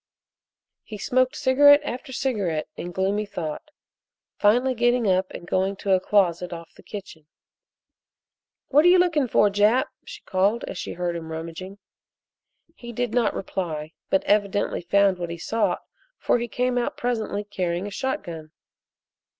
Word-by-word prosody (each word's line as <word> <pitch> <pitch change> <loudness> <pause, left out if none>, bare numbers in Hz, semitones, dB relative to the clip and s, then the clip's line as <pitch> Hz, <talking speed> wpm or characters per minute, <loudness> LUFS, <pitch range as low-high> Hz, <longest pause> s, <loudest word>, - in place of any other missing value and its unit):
He 215 - -9
smoked 255 +5 +1
cigarette 285 +3 +6
after 260 -2 -6
cigarette 205 - -1
in 175 - -6
gloomy 195 +3 -1
thought, 160 - -5 0.7
finally 245 +5 +3
getting 240 0 +2
up 185 0 +2
and - - -9
going 190 +2 0
to 195 0 -3
a 190 - +5
closet 180 -3 +1
off 170 -1 -9
the - - -17
kitchen. 180 -7 -10 1.4
"What 295 +2 +5
are - - +5
you 360 +1 +7
looking 330 -7 +2
for, 210 -3 +3
Jap?" 210 +6 +3
she - - -11
called 200 +5 +1
as 180 - -6
she - - -5
heard 175 -1 -2
him 160 -1 -6
rummaging. 165 +4 -7 1.0
He 240 -7 -10
did 240 -1 -2
not 235 -3 +1
reply, 160 -5 -4 0.2
but 190 - +2
evidently 205 -1 +1
found 195 +1 +2
what 175 -1 -4
he 170 - -5
sought 220 +6 -1 0.3
for - - +1
he 240 - -3
came 245 +2 0
out 240 - -3
presently 220 -4 -2
carrying 185 -3 -3
a 205 - -6
shotgun. 170 - -4
205 Hz, 155 wpm, -24 LUFS, 180-245 Hz, 1.4 s, you